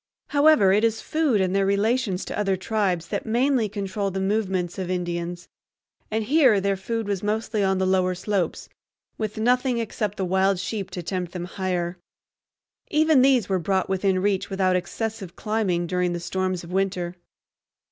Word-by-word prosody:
However, 285 -9 +5
it 210 +2 +3
is 225 -1 +2
food 305 -9 +1
and 185 0 0
their 195 - +3
relations 205 0 +1
to - - -5
other 195 -2 0
tribes 185 -4 -1
that - - -2
mainly 240 0 +2
control 200 0 -2
the 190 0 -3
movements 190 -3 -1
of 185 -1 -3
Indians; 175 -1 -3 0.6
and 220 +1 -1
here 260 -4 +4
their 195 0 +1
food 225 +3 -3
was 200 -2 -1
mostly 215 0 -1
on 190 0 +2
the 190 - +1
lower 185 -1 +2
slopes, 185 -2 -2 0.5
with 215 0 -3
nothing 250 +2 +2
except 215 -2 -3
the 190 - -1
wild 190 +1 +2
sheep 195 +2 -4
to 180 - -6
tempt 180 0 -3
them 175 -1 -4
higher. 180 -2 -3 0.9
Even 310 -2 +4
these 255 -6 +4
were 190 -1 +1
brought 190 +1 0
within 190 -1 +1
reach 200 -1 0
without 190 -2 +1
excessive 215 +1 -4
climbing 210 -6 0
during 180 0 0
the 175 - -3
storms 185 +1 -2
of 170 - -10
winter. 185 -2 -1
195 Hz, 170 wpm, -24 LUFS, 185-220 Hz, 0.9 s, However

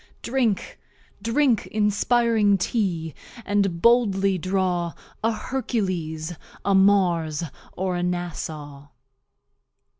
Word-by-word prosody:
Drink, 235 -5 -1 0.4
drink 240 0 +2
Inspiring 215 0 +2
TEA, 175 - -1 0.3
and 200 -4 +1
boldly 200 -5 +4
draw 180 -2 0 0.3
A 225 - +3
Hercules, 185 -10 -3 0.3
a 200 - +3
Mars, 180 -5 +3 0.3
or 185 0 -2
a 175 - -1
NASSAU. 155 -5 -4
190 Hz, 85 wpm, -24 LUFS, 175-220 Hz, 0.4 s, boldly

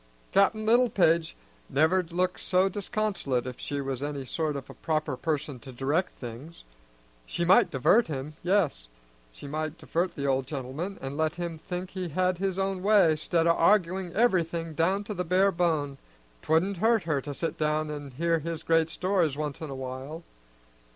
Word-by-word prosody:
"Cap'n 215 +2 +3
Littlepage 205 -9 +3 0.3
never'd 165 +4 +2
look 180 +1 0
so 185 +1 +2
disconsolate 195 - -1
if 125 -1 -7
she 145 - -3
was 135 -1 -3
any 145 -2 -4
sort 155 +2 -2
of 135 -2 -6
a - - -10
proper 155 -3 -1
person 145 -2 -2
to 130 +1 -10
direct 145 +9 -1
things. 125 +7 -9 0.6
She 170 - -1
might 185 +2 +6
divert 200 - +3
him; 145 0 -5
yes, 175 - +1 0.4
she - - -12
might 155 +2 -3
divert 175 +2 -2
the 140 - -3
old 135 -1 +1
gentleman, 145 +7 -4
an' 135 +2 -4
let 160 0 +1
him 170 -2 -5
think 180 +3 -5
he 185 -2 -4
had 180 +2 0
his 190 -1 -1
own 195 -1 -1
way, 195 -5 +5
'stead 165 +2 0
o' 170 - +5
arguing 185 0 +2
everything 170 -7 +1
down 185 +6 +1
to 210 - -5
the 180 -2 -2
bare 185 +3 +3
bone. 155 -6 0 0.4
'Twouldn't 180 +5 +1
hurt 225 +1 +3
her 150 -4 0
to 145 - -6
sit 165 +4 -4
down 155 0 0
an' 145 -1 -6
hear 165 +5 0
his 165 +1 -5
great 165 -1 +3
stories 180 -5 0
once 150 -1 -4
in 160 - -5
a 135 - -5
while." 130 +5 -6
165 Hz, 180 wpm, -28 LUFS, 145-185 Hz, 0.6 s, might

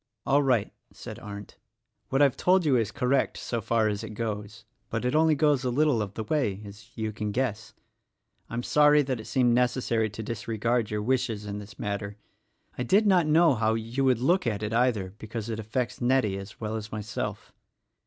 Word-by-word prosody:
"All 140 +2 +4
right," 125 -7 +1 0.2
said - - -9
Arndt; 100 0 -9 0.5
"what 135 +2 +3
I've 140 -4 +3
told 185 -1 +3
you 140 -4 +4
is 115 -4 +1
correct 135 0 0
so 115 -2 -3
far 110 +1 +1
as 105 -1 -2
it 105 - -7
goes; 110 0 -5 0.2
but 115 +2 -3
it 125 - +1
only 155 0 +4
goes 145 -3 +2
a 125 - 0
little 140 -2 +2
of 100 -1 -5
the 110 - -3
way, 110 -6 0
as 105 +3 -12
you 110 -1 -2
can 105 -1 -4
guess. 110 -2 -2 0.7
I'm 120 +1 -3
sorry 150 +1 +5
that 130 -3 -2
it 110 - -8
seemed 125 -3 +2
necessary 120 -2 +1
to 105 +2 -7
dis 115 0 -6
regard 115 0 0
your 105 0 -2
wishes 120 -3 -1
in 100 0 -5
this 105 0 -11
matter. 100 0 -4 0.6
I - - 0
did 195 - +3
not 180 -6 +4
know 160 0 +5
how 110 -1 +1
you 115 +4 -2
would 130 -3 +4
look 175 +2 +2
at 105 -2 -1
it, 105 +1 -2
either, 115 -6 +1
because 110 0 -6
it 110 -1 -3
affects 125 +3 -3
Nettie 120 -6 +2
as 100 +1 -11
well 110 0 -3
as 110 -1 -6
myself. 105 -1 -5
115 Hz, 205 wpm, -27 LUFS, 105-130 Hz, 0.7 s, sorry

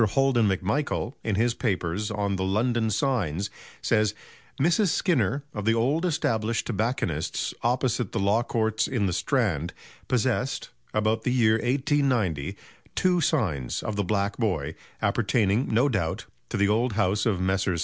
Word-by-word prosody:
Holden 120 +1 +3
MacMichael, 105 +7 -1
in 110 -3 0
his 115 +3 +2
papers 100 -3 -1
on 100 -2 -1
"The 95 - -2
London 110 +4 +1
Signs" 105 - 0 0.3
says: 110 -1 +2 0.4
"Mrs. 175 +8 +3
Skinner, 160 -5 +1
of 105 - -4
the 115 +1 +3
old 140 +10 +1
established 115 -8 0
tobacconist's 105 - -1
opposite 125 -2 0
the - - -3
Law 100 +4 +3
Courts 110 -2 0
in 120 -6 0
the 90 - 0
Strand, 90 - 0 0.3
possessed, - - 0 0.2
about 110 +1 +1
the 125 - 0
year 115 -3 +3
1890, 125 - 0 0.4
two 180 -1 +2
signs 90 - 0
of 110 - -3
the 100 - 0
'Black 100 +1 -1
Boy,' 80 - -1 0.3
appertaining, 110 +2 +1
no 120 +6 +4
doubt, 100 - -1 0.2
to 115 - -2
the 100 0 +3
old 115 +3 +1
house 100 0 +1
of 100 -5 +1
Messrs. 95 -1 0
110 Hz, 150 wpm, -26 LUFS, 100-125 Hz, 0.4 s, no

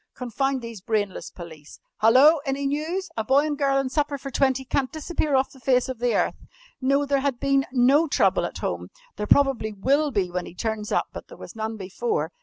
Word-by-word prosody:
"Confound 260 +1 -2
these 230 -4 -8
brainless 205 -2 -2
police! 160 -4 -12 0.2
Hallo! 265 +9 +6
Any 275 -1 -2
news? 315 +7 -2
A 220 - 0
boy 270 +6 +3
and 300 -1 -1
girl 275 -1 +1
and 270 -1 -1
supper 290 -1 0
for 275 0 -8
twenty 265 0 +1
can't 260 0 -1
disappear 310 -2 -1
off 265 0 +1
the 265 - -16
face 250 +1 +2
of 260 -3 -5
the 245 0 +1
earth. - - -1 0.3
No, 275 +2 +2
there 280 0 +1
had 270 -3 -1
been 275 0 +1
no 270 +5 +4
trouble - - +2
at - - -6
home. - - -3 0.3
There 210 - -3
probably 270 -5 +3
will 280 +9 +1
be 195 -8 -1
when 180 0 -3
he - - -12
turns 215 +1 -3
up, - - 0
but - - -8
there - - -13
was - - -11
none 220 0 -4
before! 190 -4 -2
265 Hz, 210 wpm, -24 LUFS, 220-280 Hz, 0.3 s, Hallo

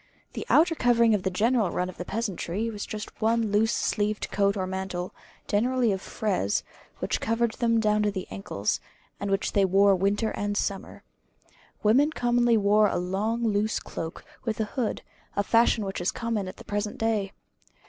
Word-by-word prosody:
The - - -6
outer 330 +2 +5
covering 235 -5 +4
of 205 - +1
the 190 - 0
general 220 +2 +2
run 180 - -1
of 185 - -9
the 180 - -5
peasantry 210 0 -2
was 205 -2 -6
just 215 0 -7
one 225 -1 +2
loose 220 +2 +3
sleeved 210 -1 -1
coat 200 0 +2
or 190 - -1
mantle, 190 -1 -4 0.3
generally 240 +2 +2
of 190 -1 -2
frieze, 190 - -1 0.3
which - - -2
covered 230 +1 +1
them 230 0 +1
down 210 -1 +2
to 210 - +2
the 190 -2 -4
ankles; 100 +1 -2 0.4
and 200 - -3
which 195 0 0
they 200 - +4
wore 195 +1 +5
winter 200 +4 +1
and 205 0 -2
summer. 195 -2 -3 0.8
Women 255 +8 +5
commonly 240 -4 +2
wore 210 +1 +4
a - - -1
long 205 +6 -1
loose 215 -1 +1
cloak, 160 0 -7 0.2
with 225 -2 -2
a - - +2
hood, 250 -5 -2 0.3
a 200 - +1
fashion 230 0 +3
which 195 -2 -4
is 175 - +1
common 230 -5 -2
at 185 - -8
the - - -12
present 205 0 -3
day. 215 -3 0
210 Hz, 180 wpm, -27 LUFS, 195-230 Hz, 0.8 s, outer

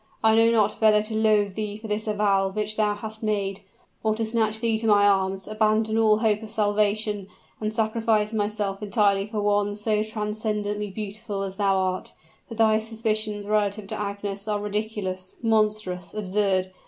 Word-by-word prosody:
I 220 0 +5
know 225 +1 +5
not 215 -2 +2
whether 215 -1 +5
to 215 +1 -4
loathe 215 -2 +3
thee 210 0 -4
for 220 +1 -9
this 210 +1 -2
avowal 200 -2 +2
which 210 +2 -2
thou 210 -1 +1
hast 220 +1 -8
made, 200 -3 -1 0.4
or 215 -1 +1
to 225 0 -1
snatch 220 -1 0
thee 230 -1 +1
to 225 - -2
my 205 -1 +5
arms, 195 -1 +1
abandon 215 0 +1
all 215 -1 +5
hope 215 -1 +1
of 220 - -8
salvation, 210 -1 0 0.3
and 215 0 -2
sacrifice 220 -1 +1
myself 205 -2 -2
entirely 200 -2 +2
for 215 -1 -3
one 205 0 +1
so 210 0 0
transcendently 210 -1 -2
beautiful 205 0 -5
as 195 -1 -6
thou 195 -2 +2
art. 185 -1 -2 0.4
But 230 - -8
thy 220 -1 +4
suspicions 215 -2 -2
relative 210 0 0
to - - -4
Agnes 200 0 -4
are 210 -1 0
ridiculous, 205 -3 -4
monstrous, 215 -5 0
absurd. 190 -2 0
210 Hz, 170 wpm, -25 LUFS, 205-220 Hz, 0.4 s, I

